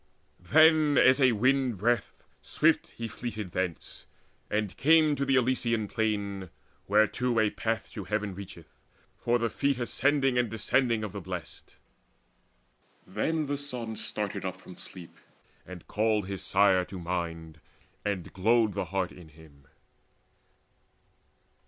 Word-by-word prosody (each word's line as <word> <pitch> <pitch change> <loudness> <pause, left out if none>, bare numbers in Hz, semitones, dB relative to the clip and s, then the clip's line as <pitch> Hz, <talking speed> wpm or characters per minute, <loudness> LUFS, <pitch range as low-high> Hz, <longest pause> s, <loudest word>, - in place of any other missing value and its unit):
Then 155 - +5
as 130 +2 +5
a 130 -2 +5
wind 130 +1 +1
breath 120 +5 +1 0.3
swift - - +2
he 115 - -7
fleeted 110 -4 -6
thence, 90 -2 -4 0.4
And 105 -2 -1
came 155 0 +4
to 140 0 -1
the 135 0 +2
Elysian 120 -4 +1
Plain, 100 -4 -2 0.4
whereto 110 +4 +2
A 110 -1 +2
path 115 0 -3
to 100 - -7
heaven 105 0 -2
reacheth, 90 -4 -11 0.4
for 120 0 +1
the 115 -1 0
feet 140 +4 0
Ascending 135 +1 +1
and 120 -2 +1
descending 110 +1 +1
of 105 - -4
the 100 - -6
Blest. 90 -3 -8 1.3
Then 155 +11 -1
the 145 0 -2
son 125 -6 -4
started 105 -1 -3
up 95 -1 -4
from 90 - -13
sleep, 90 -3 -8 0.5
and 90 -2 -10
called 105 -1 +1
His 95 0 -5
sire 95 -2 +3
to 95 - -9
mind, 85 -3 -5 0.4
and 100 -5 -3
glowed 110 +2 +2
the 95 -1 -2
heart 95 +1 -2
in 85 -3 -14
him. 75 -3 -19
105 Hz, 135 wpm, -28 LUFS, 95-125 Hz, 1.3 s, Then